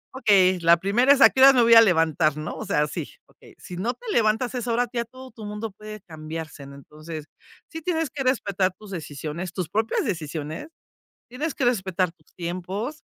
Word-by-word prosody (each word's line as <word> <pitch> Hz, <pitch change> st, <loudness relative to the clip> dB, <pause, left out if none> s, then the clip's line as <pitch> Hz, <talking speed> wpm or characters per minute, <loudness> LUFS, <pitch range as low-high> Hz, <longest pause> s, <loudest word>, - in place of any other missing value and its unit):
"Okey, 195 Hz, -7 st, +4 dB
la 170 Hz, 0 st, +6 dB
primera 230 Hz, +10 st, +4 dB
es 280 Hz, -, 0 dB
a -, -, +10 dB
qué 260 Hz, -, -1 dB
horas 270 Hz, +1 st, +9 dB
me 250 Hz, -, +4 dB
voy 230 Hz, 0 st, +6 dB
a 230 Hz, -, +11 dB
levantar", 160 Hz, -6 st, +2 dB
¿no?, 155 Hz, 0 st, -5 dB
o -, -, -6 dB
sea, 150 Hz, 0 st, +1 dB
sí, 150 Hz, -, -5 dB, 0.2 s
okey, -, -, -19 dB
si 180 Hz, -, -9 dB
no 225 Hz, +7 st, -1 dB
te -, -, -15 dB
levantas 230 Hz, -, +1 dB
a -, -, -1 dB
esa 240 Hz, -1 st, -2 dB
ahora 245 Hz, +1 st, +1 dB
ya 235 Hz, -1 st, -2 dB
todo 255 Hz, +2 st, -13 dB
tu 220 Hz, -3 st, -11 dB
mundo 210 Hz, +2 st, -5 dB
puede 215 Hz, -1 st, -9 dB
cambiarse, 155 Hz, -2 st, -8 dB
¿no?, 140 Hz, -, -11 dB
entonces 155 Hz, +2 st, -9 dB, 0.4 s
sí 325 Hz, -1 st, -8 dB
tienes 325 Hz, -3 st, -1 dB
que 275 Hz, -, -4 dB
respetar 200 Hz, -7 st, +1 dB
tus 210 Hz, -1 st, -13 dB
decisiones, 165 Hz, 0 st, -6 dB
tus 180 Hz, -4 st, -4 dB
propias 220 Hz, +4 st, 0 dB
decisiones. 160 Hz, -, -4 dB, 0.6 s
Tienes 285 Hz, +5 st, -3 dB
que 265 Hz, -, -1 dB
respetar 190 Hz, -7 st, 0 dB
tus 155 Hz, -4 st, -31 dB
tiempos 185 Hz, -, -5 dB
200 Hz, 205 wpm, -24 LUFS, 165-245 Hz, 0.6 s, a